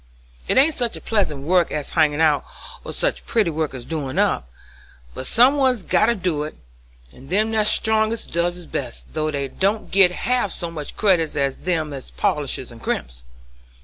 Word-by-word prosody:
It - - +1
ain't 290 +5 +5
such 240 -4 -2
pleasant 155 -11 0
work 175 +2 +2
as 150 -2 -4
hangin' 150 0 +2
out, 150 -3 +3 0.4
or - - -6
such - - -1
pretty 215 -7 +2
work 155 -3 -2
as 120 -2 -8
doin' 145 -4 -4
up, 60 - +1 0.6
but 130 - -5
some 255 +5 +5
one's 255 -6 +2
got 215 - +3
to 235 - +2
do 180 -7 -1
it, 150 +1 -5 0.6
and 130 - -15
them 215 +5 +1
that's 215 -1 +2
strongest 220 0 +1
does 175 +1 0
it 175 -2 -11
best, 125 -4 -5
though 155 0 -1
they 140 -2 -2
don't 200 +9 -1
git 195 -2 +6
half 245 +4 0
so 170 -1 -1
much 150 -3 -7
credit 180 -8 +2
as 140 -2 0
them 160 -5 -2
as 135 -2 -7
polishes 135 -4 -2
and 115 -1 -13
crimps. - - -3
170 Hz, 185 wpm, -22 LUFS, 145-215 Hz, 0.6 s, git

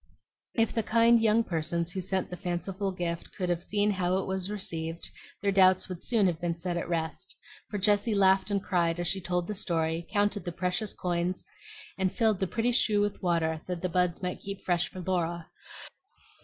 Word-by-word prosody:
If 225 -2 +2
the 225 - +1
kind 230 +2 +4
young 225 +1 +4
persons 170 -1 -2
who 190 - -3
sent 190 0 -1
the - - -3
fanciful 190 +2 -3
gift 170 -2 -4
could 180 -2 -2
have 175 -1 0
seen 205 0 +1
how 185 -1 +1
it 190 - -1
was 190 0 -2
received, 165 -5 -3 0.4
their 200 - +3
doubts 185 -1 +5
would 180 -2 -6
soon 225 -5 +2
have 170 -3 0
been 170 -1 -1
set 175 +1 -3
at 170 - -3
rest; 160 -2 -3 0.3
for 205 - -3
Jessie 205 +2 +2
laughed 190 0 +4
and 200 -1 0
cried 170 -3 +1
as 175 - 0
she 190 +2 +1
told 180 0 -1
the 210 - -4
story, 165 -4 -1
counted 205 -1 +1
the 175 - -4
precious 180 +4 -1
coins, 175 0 -2 0.5
and 190 -1 +2
filled 220 -5 +2
the 190 - 0
pretty 230 +6 0
shoe 220 -4 +3
with 205 0 -1
water 160 -3 0
that 180 -1 -4
the 185 - 0
buds 180 0 0
might 180 0 -2
keep 195 0 -7
fresh 175 -1 +1
for 185 - -8
Laura. 175 -2 -2
185 Hz, 200 wpm, -29 LUFS, 175-205 Hz, 0.5 s, doubts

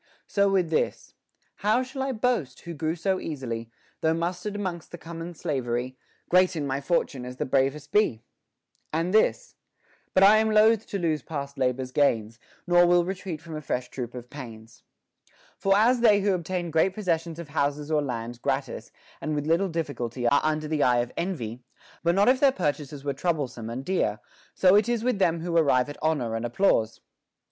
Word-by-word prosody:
So 200 -1 +2
with 185 -4 +1
this: 155 - -1 0.4
How 215 +5 +2
shall 265 +1 -6
I 270 0 -1
boast, 225 - -1
who 170 - -7
grew 160 +1 -2
so 190 +2 0
easily, 115 -7 -5 0.3
Though 160 0 +2
mustered 180 +5 -3
'mongst 175 -5 -4
the 175 - -8
common 165 +1 -8
soldiery; 125 -3 -2 0.3
Great 185 0 +4
in 150 -3 -2
my 135 0 -2
fortune 140 -4 -1
as 125 +1 -8
the - - -1
bravest 135 +2 0
be 165 - +2 0.7
1 - - -41
And 175 +3 -1
this 485 - +2 0.6
But 190 - +6
I 205 +2 +8
am 220 0 +2
loath 220 0 +4
to 200 - -3
lose 160 -5 0
past 140 -1 -6
labor's 130 0 0
gains; 115 -6 +1 0.3
Nor 175 -1 +5
will 175 0 +4
retreat 185 -4 -5
from 165 -2 -8
a 155 - -5
fresh 125 -3 -3
troop 125 -2 -6
of 125 0 -9
pains.* 115 -4 -10 0.8
For 195 0 +3
as 240 +4 +4
they 215 -4 +5
who 200 0 +2
obtain 175 -1 -3
great 160 +4 +2
possessions 170 -5 -1
of 170 -3 -8
houses 145 0 -1
or 155 -1 +3
lands 120 -3 -4
gratis - - -3 0.3
and 155 -1 -2
with 145 0 -2
little 170 +5 +2
difficulty 130 -7 -3
are 140 - +4
under 155 0 0
the 155 -1 -1
eye 120 -2 +4
of 120 - -5
envy, 125 - -4 0.4
but 170 +1 +2
not 200 +1 +4
if 255 +1 +4
their 275 -1 +5
purchases 145 - -3
were 140 -1 -1
troublesome 140 -7 -2
and 125 +3 -5
dear, 120 - 0 0.4
so 185 0 +5
it 210 +3 +4
is 235 -2 0
with 250 -4 0
them 170 -3 +2
who 170 0 -3
arrive 140 -5 +3
at 145 - -8
honor 145 -8 0
and 115 - -3
applause. 120 - +2
15. - - -29
160 Hz, 195 wpm, -26 LUFS, 130-190 Hz, 0.8 s, I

